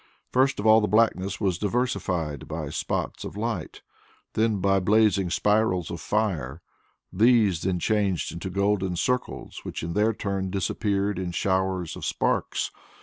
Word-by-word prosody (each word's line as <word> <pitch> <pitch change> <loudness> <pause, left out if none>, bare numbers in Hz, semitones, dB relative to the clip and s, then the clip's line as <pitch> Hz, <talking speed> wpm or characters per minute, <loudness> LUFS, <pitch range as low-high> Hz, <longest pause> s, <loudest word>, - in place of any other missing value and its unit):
First 130 -1 +2
of 100 - -3
all 110 0 +7
the 105 - +1
blackness 100 -4 +2
was 95 -4 0
diversified 95 - -1
by - - -4
spots - - -3
of - - -7
light, 110 -6 -4 0.5
then 110 -1 +2
by 95 0 +2
blazing 100 -1 +3
spirals 105 -3 +1
of 85 - -5
fire; 85 - -1 0.5
these 105 -4 +4
then 95 -1 0
changed 100 -2 0
into 85 +3 -5
golden 100 -1 0
circles, 125 +8 -2
which - - -6
in 85 +1 -3
their 105 +3 +3
turn 100 -3 -3
disappeared 100 +1 -1
in 90 -2 -3
showers 95 -2 0
of - - -9
sparks. - - -1
100 Hz, 145 wpm, -26 LUFS, 90-110 Hz, 0.5 s, all